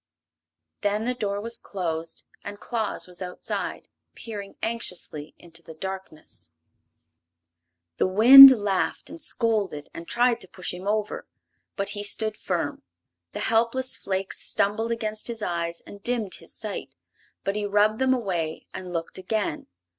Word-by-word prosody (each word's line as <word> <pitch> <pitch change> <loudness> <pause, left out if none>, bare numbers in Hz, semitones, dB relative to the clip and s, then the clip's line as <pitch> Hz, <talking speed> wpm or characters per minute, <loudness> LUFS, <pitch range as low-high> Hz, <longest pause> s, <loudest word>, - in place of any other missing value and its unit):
Then 210 +1 0
the 250 - 0
door 205 -5 -2
was 230 +3 -5
closed 165 -4 -4 0.2
and 205 0 -7
Claus 225 -3 -2
was 180 0 -9
outside, 180 -1 -5 0.3
peering 205 -3 -8
anxiously 180 -9 -4
into 165 -1 -11
the 160 -1 -12
darkness. 160 - -7 1.5
The - - +2
wind 250 +8 +12
laughed 205 -6 0
and 325 +1 -10
scolded 215 - -1
and 165 0 -9
tried 240 0 +2
to - - -5
push 180 0 -3
him 180 +2 -7
over, 210 0 -2 0.5
but 200 -2 -1
he 205 0 -3
stood 215 +1 -1
firm. 170 -8 -3 0.5
The - - -4
helpless 235 +3 +2
flakes 190 0 -3
stumbled 220 +3 +1
against 215 -2 -2
his 230 -2 -5
eyes 170 -2 -2
and 200 - -13
dimmed 225 -4 -1
his - - -7
sight, - - -6 0.5
but 195 - -1
he 210 -1 -1
rubbed 210 +2 +2
them 260 0 +3
away 175 -9 -3
and 185 -1 -7
looked 165 +1 -4
again. 195 -4 -2
205 Hz, 145 wpm, -25 LUFS, 180-225 Hz, 1.5 s, wind